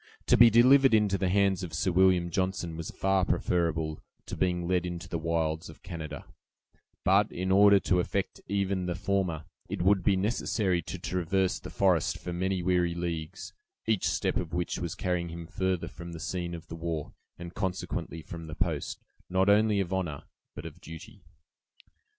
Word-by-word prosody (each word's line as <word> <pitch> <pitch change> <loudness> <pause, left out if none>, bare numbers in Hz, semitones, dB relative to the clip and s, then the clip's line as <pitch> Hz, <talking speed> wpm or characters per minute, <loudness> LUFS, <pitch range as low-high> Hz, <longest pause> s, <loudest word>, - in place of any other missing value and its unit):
To - - +5
be 120 -1 +8
delivered 130 +2 +6
into 105 -2 +3
the 95 - +1
hands 100 -1 +2
of 85 -4 -5
Sir 95 +3 0
William 90 -1 +3
Johnson 95 -2 -1
was 80 -1 -5
far 95 -1 +1
preferable 80 -4 0 0.3
to - - -5
being 90 -2 0
led 90 -1 +1
into 90 -1 -5
the 85 - -3
wilds 80 0 -1
of 80 - -14
Canada; 80 -5 -7 0.8
but - - +3
in 95 +1 -2
order 100 +1 +7
to 90 - +2
effect 95 +2 -2
even 100 -2 -1
the 90 - -2
former, 90 -5 -1 0.2
it - - -2
would 95 +1 +4
be 100 - +3
necessary 95 -2 0
to 95 - -6
traverse 90 +1 0
the - - -9
forest 95 -5 +2
for 90 - -6
many 95 +1 -1
weary 90 -1 +1
leagues, 85 +1 -5 0.3
each 110 -4 +1
step - - 0
of 85 0 -3
which 90 -1 -2
was 85 -3 -4
carrying 90 -2 -1
him 85 0 -7
further 95 +1 -2
from 85 0 -9
the 85 - -7
scene 85 +1 -3
of 85 - -10
the - - -7
war, 80 -2 -4 0.2
and, 85 0 -8
consequently, 90 -4 -4
from 85 0 -8
the 80 - -7
post, 85 -3 -2 0.3
not 95 +2 +2
only 105 0 +4
of 95 -1 -2
honor, 90 -7 -2 0.3
but - - -8
of - - -10
duty. 100 +6 -11
90 Hz, 180 wpm, -29 LUFS, 85-95 Hz, 0.8 s, be